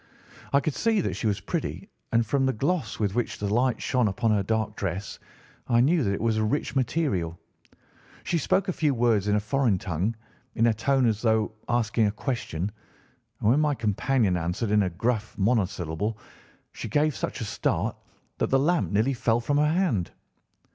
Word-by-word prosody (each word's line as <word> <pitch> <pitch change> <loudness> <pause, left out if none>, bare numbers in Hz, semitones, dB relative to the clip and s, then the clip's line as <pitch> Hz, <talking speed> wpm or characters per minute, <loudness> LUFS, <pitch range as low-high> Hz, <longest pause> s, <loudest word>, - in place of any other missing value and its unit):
I 140 - +4
could 155 - -1
see 225 - +1
that - - -2
she 115 - -2
was 100 -1 0
pretty, - - -4 0.2
and 115 0 +3
from 135 +4 +1
the 130 - +1
gloss 160 +9 -1
with 100 -3 0
which 120 +1 -1
the 100 - -3
light 125 +1 +2
shone 125 -4 +2
upon 110 +3 0
her 105 -2 +3
dark 110 +1 -1
dress 95 +1 -4 0.5
I 120 - +3
knew 150 +5 +3
that 100 - +1
it - - -3
was 115 -1 +1
a 110 - +1
rich 140 +5 -1
material. 120 - 0 0.9
She 170 - 0
spoke 190 +6 +1
a 185 - 0
few 150 -5 +1
words 115 -4 +2
in 105 - +3
a - - +3
foreign 115 0 +1
tongue 90 +6 -2 0.4
in 115 - +3
a 115 - +4
tone 130 +4 +2
as 110 -2 +1
though 110 -2 +2 0.2
asking 115 -2 +2
a - - 0
question, 105 - -3 0.7
and 105 - +3
when 135 - +4
my 150 -2 +2
companion 110 -2 +1
answered 90 +6 -2
in 105 0 +4
a 95 - +1
gruff 110 +5 -2
monosyllable 100 -2 0 0.5
she - - -7
gave 150 +5 +2
such - - -4
a 115 - -3
start - - -1 0.4
that - - +1
the 135 - +4
lamp 135 - +1
nearly 110 +7 +2
fell 115 -1 +1
from 145 +5 0
her 150 +1 +3
hand. 160 - +1
115 Hz, 195 wpm, -26 LUFS, 105-135 Hz, 0.9 s, I